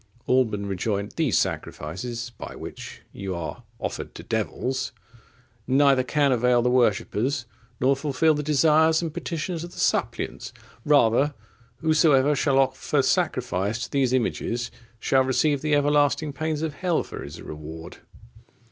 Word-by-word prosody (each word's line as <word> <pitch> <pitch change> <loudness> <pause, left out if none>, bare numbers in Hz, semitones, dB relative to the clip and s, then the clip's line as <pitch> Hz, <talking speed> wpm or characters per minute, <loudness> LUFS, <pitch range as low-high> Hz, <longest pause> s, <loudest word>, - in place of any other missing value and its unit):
Alban 110 -6 +2
rejoined, 100 +1 -2
"These 155 - +1
sacrifices, 115 +10 -3 0.2
which - - -9
by - - -38
you 95 -2 -3
are 85 -2 -5 0.2
offered - - -5
to - - -8
devils, 130 +1 -2 0.7
neither 135 0 +4
can 140 +2 +1
avail 125 0 +3
the 125 - +2
worshippers, 125 +2 +1 0.3
nor 135 +2 +3
fulfil 145 +3 +2
the 150 - -2
desires 155 +2 +3
and 160 -2 -3
petitions 165 +1 -4
of 175 - -9
the - - -10
suppliants. - - -1 0.3
Rather, 145 0 +4 0.5
whosoever 150 -3 +4
shall 140 -1 +2
offer 135 +1 +1
sacrifice 120 - 0
to - - -7
these 135 -3 +2
images, 120 -1 -1 0.3
shall 130 +3 +3
receive 135 +2 +1
the 150 -1 +2
everlasting 145 +1 +2
pains 155 0 -2
of 160 -2 -2
hell 175 +1 0
for - - -8
his 75 +4 -9
reward." 80 +3 -9
135 Hz, 140 wpm, -25 LUFS, 115-150 Hz, 0.7 s, neither